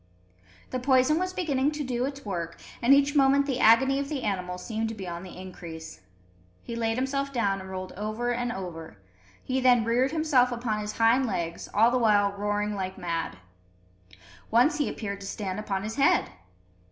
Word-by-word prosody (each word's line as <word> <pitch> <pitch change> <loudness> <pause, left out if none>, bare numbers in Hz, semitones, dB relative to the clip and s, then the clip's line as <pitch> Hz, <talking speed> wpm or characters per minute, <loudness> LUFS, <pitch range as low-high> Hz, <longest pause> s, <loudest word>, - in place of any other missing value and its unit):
The 255 - -1
poison 260 +4 +3
was 370 0 -1
beginning 290 -7 0
to 295 0 -3
do 250 -1 -1
its 280 -1 -6
work, 170 -4 -4 0.2
and 240 - +3
each 280 +1 +5
moment 280 0 +4
the 265 -3 -2
agony 265 +5 +5
of 280 0 -3
the 290 -4 -3
animal 180 -3 -2
seemed 220 +4 -3
to 225 - -5
be 195 -3 -7
on 170 0 -5
the 185 -1 -10
increase. 170 - -9 0.6
He 235 - -6
laid 225 0 -1
himself 275 +2 -1
down 200 -6 0
and 190 - -9
rolled 185 0 -6
over 215 +4 -3
and 245 0 -1
over; 165 - -7 0.5
he 260 0 -1
then 245 -3 +4
reared 245 +3 +2
himself 290 -6 +2
upon 235 -3 -2
his 210 0 -4
hind 235 +3 +4
legs, 170 -5 -3
all 225 +3 +4
the 255 - +2
while 205 -3 +3
roaring 205 +1 -1
like 190 -1 -4
mad. 165 - -3 1.1
Once 250 +9 +3
he 290 - +1
appeared 200 -2 -5
to 195 - -7
stand 195 -1 -4
upon 195 -2 -3
his 220 +4 -5
head. 275 - +3
225 Hz, 190 wpm, -27 LUFS, 195-265 Hz, 1.1 s, each